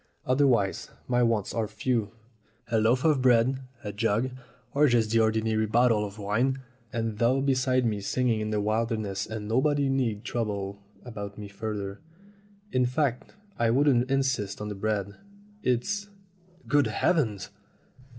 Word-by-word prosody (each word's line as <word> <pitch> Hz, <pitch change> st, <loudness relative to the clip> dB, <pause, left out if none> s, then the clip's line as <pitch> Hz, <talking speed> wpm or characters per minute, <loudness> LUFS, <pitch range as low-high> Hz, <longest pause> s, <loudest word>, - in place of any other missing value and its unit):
Otherwise 130 Hz, -7 st, +2 dB, 0.2 s
my 125 Hz, 0 st, +2 dB
wants 115 Hz, -4 st, +1 dB
are 115 Hz, -2 st, -1 dB
few. 110 Hz, 0 st, -1 dB, 0.6 s
A 115 Hz, -, +3 dB
loaf 115 Hz, +4 st, +2 dB
of 150 Hz, -5 st, +4 dB
bread, 125 Hz, +1 st, +4 dB, 0.2 s
a 105 Hz, -, -5 dB
jug 115 Hz, +4 st, 0 dB, 0.4 s
or 150 Hz, +1 st, +5 dB
just 115 Hz, -4 st, +2 dB
the 115 Hz, -, +4 dB
ordinary 110 Hz, 0 st, +1 dB
bottle 115 Hz, -1 st, +3 dB
of 100 Hz, 0 st, -6 dB
wine, 115 Hz, +6 st, 0 dB, 0.3 s
and 115 Hz, -2 st, -3 dB
thou 125 Hz, +3 st, +3 dB
beside 130 Hz, -2 st, +2 dB
me 105 Hz, -3 st, 0 dB
singing 115 Hz, +1 st, 0 dB
in 110 Hz, -, -2 dB
the 105 Hz, -1 st, 0 dB
wilderness, 110 Hz, -2 st, -1 dB
and 110 Hz, -1 st, -5 dB
nobody 140 Hz, +4 st, +2 dB
need 120 Hz, -6 st, 0 dB
trouble 100 Hz, -4 st, -3 dB, 0.2 s
about 105 Hz, -4 st, -7 dB
me 105 Hz, -1 st, -7 dB
further; 100 Hz, +1 st, -5 dB, 0.7 s
in 130 Hz, -, +2 dB
fact, 125 Hz, -1 st, -1 dB, 0.2 s
I 115 Hz, -1 st, +3 dB
wouldn't 130 Hz, 0 st, +3 dB
insist 130 Hz, -7 st, 0 dB
on 105 Hz, 0 st, -4 dB
the -, -, -3 dB
bread. 100 Hz, 0 st, -2 dB, 0.4 s
It's 200 Hz, -, -1 dB, 0.6 s
Good 145 Hz, -1 st, +3 dB
heavens 110 Hz, -, 0 dB
115 Hz, 145 wpm, -27 LUFS, 105-130 Hz, 0.7 s, or